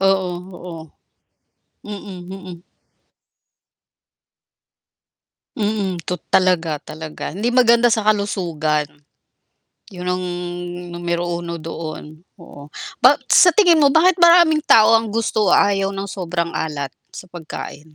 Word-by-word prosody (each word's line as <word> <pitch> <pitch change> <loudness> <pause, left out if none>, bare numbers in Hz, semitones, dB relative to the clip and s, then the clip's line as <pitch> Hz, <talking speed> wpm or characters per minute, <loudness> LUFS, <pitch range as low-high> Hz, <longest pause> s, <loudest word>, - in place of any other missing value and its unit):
Oo, 195 -1 +1 0.2
oo. 175 -2 -9 1.1
Mm, 200 -3 -9
mm. 185 -2 -10 2.9
Mm, 205 -5 -2
tot 180 +2 -4 0.2
talaga, 170 -5 +1
talaga 155 0 -8
hindi 200 +7 -4
maganda 240 -1 +4
sa 225 -2 +1
kalusugan. 170 -8 -1 1.0
'Yon 180 -3 -9
ang 180 0 -2 0.7
numero 175 0 -3 0.2
uno 170 0 -6
doon. 155 -1 -8 0.2
Oo. 145 -5 -14 0.3
Ba 260 +4 +6
sa 355 - +6
tingin 350 -5 +4
mo 285 - +5
bakit 330 +6 +4
maraming 340 -2 +6
tao 225 -7 +5
ang 225 -1 +2
gusto 215 -2 0
o - - +4
ayaw 195 -1 +2
ng 195 0 -5
sobrang 175 -3 -4
alat 145 -3 -4 0.2
sa - - -11
pagkain? 170 -4 -9
185 Hz, 115 wpm, -19 LUFS, 170-220 Hz, 2.9 s, Ba